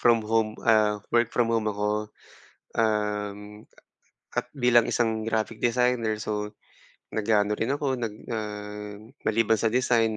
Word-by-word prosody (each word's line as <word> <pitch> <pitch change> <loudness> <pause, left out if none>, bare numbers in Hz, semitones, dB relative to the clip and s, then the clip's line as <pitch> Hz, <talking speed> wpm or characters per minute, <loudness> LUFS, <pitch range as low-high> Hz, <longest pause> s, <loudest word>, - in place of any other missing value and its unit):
from 115 -2 +4
home 110 0 +1
ah, 110 -2 +4 0.2
work 120 0 +4
from 115 -1 +1
home 110 -2 +1
ako. 105 +1 -1 0.7
Um, 105 -1 -1 0.7
at - - -2
bilang 125 -4 +3
isang 110 -2 +1
graphic 110 0 -2
designer, 120 -2 +2
so 105 0 -3 0.6
nag-aano 105 -1 +2
rin 120 +6 0
ako, 135 -4 -1
nag, 115 -3 -3 0.2
ah, 105 -1 -5 0.3
maliban 110 -1 +2
sa 115 - +3
design, 115 -2 +2
110 Hz, 130 wpm, -26 LUFS, 105-115 Hz, 0.7 s, from